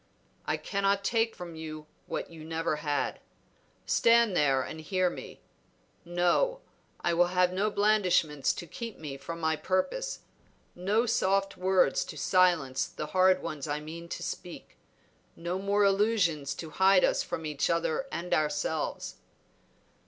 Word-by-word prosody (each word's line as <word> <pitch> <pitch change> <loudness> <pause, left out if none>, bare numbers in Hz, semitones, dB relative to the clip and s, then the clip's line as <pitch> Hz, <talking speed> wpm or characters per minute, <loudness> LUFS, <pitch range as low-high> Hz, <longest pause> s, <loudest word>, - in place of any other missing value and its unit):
"I - - +1
cannot 200 0 0
take 225 +2 +1
from 175 -2 -8
you 155 -1 -7 0.2
what - - -4
you 160 -2 -10
never 160 -1 -2
had. 145 -1 -2 0.7
Stand 230 -4 +4
there 135 -4 +3
and 160 - -7
hear 185 +2 +1
me. - - -10 0.6
No; 180 - +1 0.4
I 175 - +1
will 175 +1 +4
have 180 0 +2
no 200 +3 +1
blandishments 185 -9 +2
to - - -7
keep 230 +3 -7
me 145 -3 -6
from 165 +4 -7
my 160 -1 +1
purpose, 275 - -1 0.5
no 205 +6 +1
soft 195 -3 +1
words 185 -6 +2
to - - -9
silence 170 -8 +2
the - - -6
hard 185 0 +4
ones 150 -2 -5
I 145 0 -1
mean 165 +3 -9
to - - -5
speak, - - -7 0.6
no 175 +2 -3
more 200 +1 +2
illusions 195 -8 +2
to 160 -2 -7
hide 190 +2 +5
us - - +3
from 160 - -5
each 150 -2 -1
other 170 - 0
and 175 +1 -3
ourselves." 155 0 -1
180 Hz, 145 wpm, -29 LUFS, 160-195 Hz, 0.7 s, hide